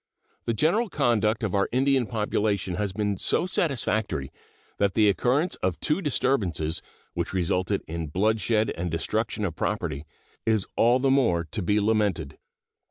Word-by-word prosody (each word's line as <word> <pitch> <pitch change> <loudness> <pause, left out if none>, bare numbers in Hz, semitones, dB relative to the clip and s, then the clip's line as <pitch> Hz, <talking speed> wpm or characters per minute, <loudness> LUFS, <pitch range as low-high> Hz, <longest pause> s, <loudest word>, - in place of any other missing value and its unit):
The 115 - 0
general 195 - +2
conduct 115 - +1
of 100 - -1
our 100 -1 +1
Indian 130 -1 +2
population 105 -4 -1
has 100 +2 -2
been 100 0 -1
so 175 - +1
satisfactory 110 - -1 0.5
that 100 -1 +1
the 110 -2 +5
occurrence 130 - +1
of 90 -2 -2
two 155 +5 0
disturbances, 100 - 0 0.3
which - - -3
resulted 90 0 0
in 80 0 -4
bloodshed 110 +5 +1
and 85 +1 -3
destruction 105 +6 -1
of 85 -4 -3
property, 70 -1 -3 0.4
is 110 -4 +2
all 120 +2 +4
the 135 +1 +2
more 115 -12 +3
to - - -3
be 105 +3 +2
lamented. 105 -9 0
105 Hz, 150 wpm, -26 LUFS, 95-120 Hz, 0.5 s, the